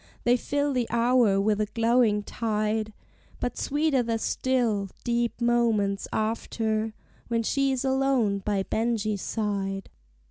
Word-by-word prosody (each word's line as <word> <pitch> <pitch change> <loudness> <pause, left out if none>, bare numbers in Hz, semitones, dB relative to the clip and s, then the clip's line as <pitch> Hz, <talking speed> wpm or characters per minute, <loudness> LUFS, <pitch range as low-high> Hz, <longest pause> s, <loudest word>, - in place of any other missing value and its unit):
They 245 0 +4
fill 285 +3 -1
the 245 -3 0
hour 235 -3 +3
with 210 +1 +1
a 210 - 0
glowing 230 -2 +2
tide; 215 0 -1 0.5
But 245 - -2
sweeter 290 -2 +1
the 230 -1 -1
still, 225 -5 0
deep 235 -1 -1
moments 230 -5 +1
after, 220 0 -1 0.3
When 230 -1 0
she 275 +4 +1
is 265 0 -1
alone 265 -6 +2
by 195 -1 -1
Benjie's 215 -2 -1
side. 195 -3 -3
225 Hz, 130 wpm, -26 LUFS, 210-245 Hz, 0.5 s, They